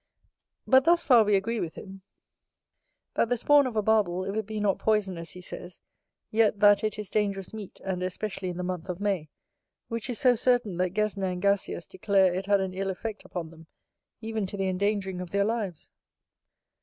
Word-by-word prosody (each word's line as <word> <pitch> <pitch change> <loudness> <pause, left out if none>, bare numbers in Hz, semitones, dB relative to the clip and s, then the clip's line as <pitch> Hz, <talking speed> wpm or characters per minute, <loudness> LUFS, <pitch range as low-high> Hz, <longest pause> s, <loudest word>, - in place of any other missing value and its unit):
But 260 0 +5
thus 340 0 +4
far 245 -5 +6
we 210 -1 +3
agree 225 +4 0
with 165 -4 -4
him, 195 0 -10 1.1
that 230 - +1
the 245 - +1
spawn 285 +3 +5
of 240 - -6
a 215 - +1
Barbel, 195 -4 +2
if 195 +1 -3
it 220 -2 -2
be 215 -1 -4
not 205 -2 +1
poison, 210 -4 +1
as 165 0 -7
he 180 - -10
says, 175 0 -8 0.5
yet 215 -2 +3
that 205 0 +6
it 215 0 -1
is 210 -1 -5
dangerous 200 -2 -1
meat, 210 -3 -8
and 185 -2 -2
especially 185 +1 -3
in 175 - -5
the 180 - -3
month 180 0 -4
of 180 0 -4
May, 195 -7 -1 0.6
which 230 +1 -4
is 245 - -2
so 250 +2 +5
certain, 240 -6 +1
that 185 +1 -1
Gesner 210 -2 0
and 180 - -4
Gasius 200 -2 0
declare 195 -3 +2
it 190 +2 -3
had 200 -1 +3
an 190 -1 -3
ill 195 +1 -2
effect 215 +3 -5
upon 165 -3 -6
them, 165 -1 -15 0.5
even 220 -3 -2
to 200 - -6
the 190 -1 0
endangering 190 -1 -1
of 180 - -6
their 200 +2 +1
lives. 210 -7 -3
200 Hz, 205 wpm, -27 LUFS, 185-215 Hz, 1.1 s, far